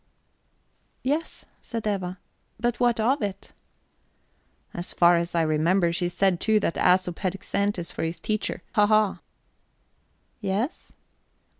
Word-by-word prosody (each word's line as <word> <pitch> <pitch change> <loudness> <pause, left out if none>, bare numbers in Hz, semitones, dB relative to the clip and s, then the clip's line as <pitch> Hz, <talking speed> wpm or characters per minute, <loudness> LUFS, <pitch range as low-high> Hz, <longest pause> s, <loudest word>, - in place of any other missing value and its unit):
"Yes," 295 +6 -2 0.2
says 230 -2 -5
Eva; 190 -3 -2 0.4
"but 240 +1 0
what 240 -2 +2
of 260 +6 +2
it?" 200 -1 -5 1.2
"And - - -6
as 175 - -5
far 175 0 +5
as 170 0 -1
I 165 - +3
remember, 170 +3 +2
she 175 +1 0
said, 180 0 +1
too, 220 +1 +3
that 165 - 0
Æsop 180 -1 +2
had 185 -3 -1
Xanthus 200 -4 -1
for - - -5
his 165 +1 -3
teacher. 215 -1 -2
Hahaha!" 210 -1 +3 1.2
"Yes?" 210 - -3
195 Hz, 130 wpm, -26 LUFS, 175-215 Hz, 1.2 s, far